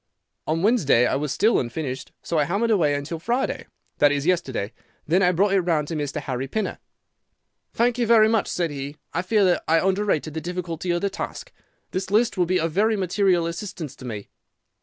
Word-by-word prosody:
On 165 +2 0
Wednesday 190 - +4
it - - 0
was 150 -2 -2
still 220 +9 +3
unfinished, 130 +1 -4
so 165 - 0
I 150 - +3
hammered 205 +8 0
away 155 -9 +3
until 145 +3 -4
Friday—that 235 - -1
is, 145 0 -1
yesterday. 135 - 0 0.3
Then 175 +5 +2
I 180 -1 +4
brought 195 +3 +2
it 195 - +4
round 160 -4 0
to 165 - -3
Mr. 150 0 -2
Harry 130 -1 -3
Pinner. 215 +10 -3 1.0
"'Thank 240 +1 +2
you 235 - +1
very 220 -2 +6
much,' 220 -1 +1
said 170 -3 -1
he; 140 +1 -6 0.2
'I 165 - 0
fear 205 +2 +2
that 180 -1 +2
I 165 - +4
underrated 190 -5 0
the 160 - -4
difficulty 175 0 -4
of 175 0 +1
the 200 - 0
task. - - -6 0.4
This 185 0 -3
list 220 +3 +2
will 180 -3 +1
be 185 +1 +2
of 165 0 -1
very 215 +6 +2
material 185 -2 +2
assistance 170 -4 -5
to 130 - -10
me. 105 -4 -6
175 Hz, 200 wpm, -24 LUFS, 150-200 Hz, 1.0 s, very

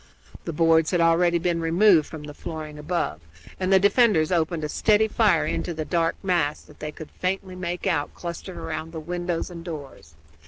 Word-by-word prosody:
The - - -2
boards 165 0 +3
had 175 - +1
already 170 +1 +4
been 170 -1 0
removed 170 0 +4
from 155 -2 -8
the 150 0 -8
flooring 155 -1 -7
above, 150 - -2 0.4
and 185 0 0
the 190 - +7
defenders 200 -5 +4
opened 165 -2 0
a - - 0
steady 215 +6 +3
fire 220 -1 +3
into 170 - -2
the 155 0 -3
dark 165 -1 +1
mass 170 -6 +1
that 150 - -18
they 150 0 -5
could 155 0 -10
faintly 185 0 -3
make 180 -1 -4
out 170 -6 0
clustered 175 +2 -7
round 165 0 -5
the 160 - -4
windows 175 +2 -3
and 170 -1 -8
doors. 140 - -9
170 Hz, 190 wpm, -24 LUFS, 155-180 Hz, 0.4 s, the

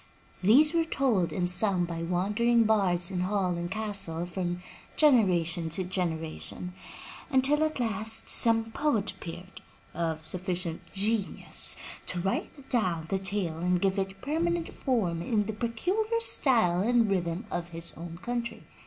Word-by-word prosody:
These 275 - +5
were 335 -1 +3
told 255 - 0
and 180 -2 -1
sung 180 0 +4
by 170 -1 -5
wandering 210 +7 +2
bards 195 -5 +3
in 185 - -2
hall 185 -1 0
and 170 0 -4
castle 195 -5 -3
from 175 0 -4 0.3
generation 180 - +3
to 175 +4 0
generation, 180 0 -4 0.6
until 285 +2 +3
at 310 -3 -1
last 220 -1 +2
some 225 -1 +3
poet 230 -7 0
appeared, 180 +2 -10 0.3
of 165 -1 -2
sufficient 180 -1 -2
genius 205 +1 0 0.3
to 180 - -2
write 195 - -3
down 180 - 0
the 195 - 0
tale 190 -4 -2
and 180 +1 +1
give 195 +1 +1
it 195 0 -4
permanent 330 +3 -1
form 195 - -1
in 210 +3 0
the 220 - -4
peculiar 370 - -1
style 225 - +3
and 235 +1 +3
rhythm 175 +1 -1
of 175 0 -3
his 170 0 -1
own 170 0 -8
country. 240 0 -3
195 Hz, 145 wpm, -28 LUFS, 175-235 Hz, 0.6 s, These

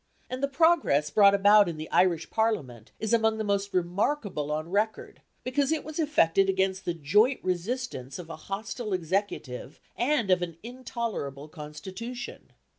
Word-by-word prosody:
And 255 +1 -4
the 280 - +2
progress 275 - +3
brought 200 +2 +6
about 205 -1 +6
in 165 - -5
the 155 +1 -6
Irish 170 -3 +2
Parliament 145 - -1
is 220 +1 -1
among 220 -1 +3
the 220 - -2
most 200 -1 -1
remarkable 185 - -1
on 155 +1 -2
record, 215 +2 -1 0.2
because 275 +3 0
it 320 - 0
was 310 +1 -7
effected 195 - +3
against 190 0 0
the 175 - -1
joint 210 - +3
resistance 180 - -3
of 175 - -8
a 165 - -7
hostile 210 +2 -4
Executive 170 -7 -3 0.2
and 240 -6 +1
of 180 -1 +4
an 170 -2 -4
intolerable 230 - -5
constitution. 190 +11 -8
200 Hz, 155 wpm, -28 LUFS, 165-235 Hz, 0.2 s, brought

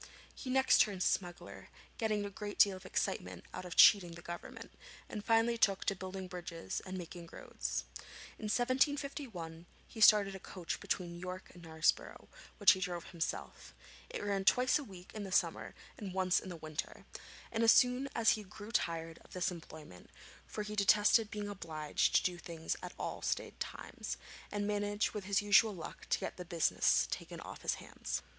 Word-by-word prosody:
He 255 - -8
next 265 +1 +5
turned 195 -4 +1
smuggler, 175 -2 -2 0.3
getting 215 -3 0
a 200 - -5
great 205 +1 -6
deal 200 -2 +6
of 185 - -10
excitement - - -2
out - - -6
of 180 - -6
cheating 180 -5 +7
the 170 0 -11
Government, 175 0 -8 0.4
and 210 -2 -6
finally 230 +1 +3
took 195 -3 +3
to 200 - +1
building 185 0 -6
bridges 175 -2 -5
and 185 0 -4
making 170 -1 -8
roads. - - -4 0.6
In 220 - -6
1751 250 - -1 0.2
he 220 - -9
started 205 -2 +7
a 190 - -7
coach 180 -2 -5
between 175 -2 -3
York 185 +1 -7
and 175 - -13
Knaresborough, 160 -1 0 0.3
which 205 - +8
he 190 - +1
drove 175 -2 -4
himself. 170 -3 -4 0.3
It - - -5
ran 200 -1 0
twice 250 +7 +4
a - - -5
week 185 -7 -12
in 215 - -5
the 195 - -6
summer - - +1 0.2
and 195 -4 -6
once 185 -1 +3
in 190 - -9
the 180 - -5
winter; 155 0 -6 0.5
and 230 0 0
as 225 - +8
soon 250 +2 +4
as 225 -1 +5
he 215 - 0
grew 205 +2 -10
tired 165 -6 -1
of - - -17
this 185 0 0
employment, 155 - -11 0.4
for 210 - -4
he 210 0 -5
detested 210 +2 +5
being 210 -1 -4
obliged 160 -6 -1
to - - +5
do 180 -1 -1
things 165 -2 -4
at - - -7 0.3
stated - - -2
times, - - -5 0.3
he - - -3
managed 205 0 0
with 210 -2 -5
his 200 +1 +2
usual 205 +1 +5
luck 165 - -9
to - - +3
get - - -5
the 180 - -5
business 170 -2 +2
taken - - -5
off - - -9
his - - 0
hands. - - -5
195 Hz, 180 wpm, -34 LUFS, 175-210 Hz, 0.6 s, which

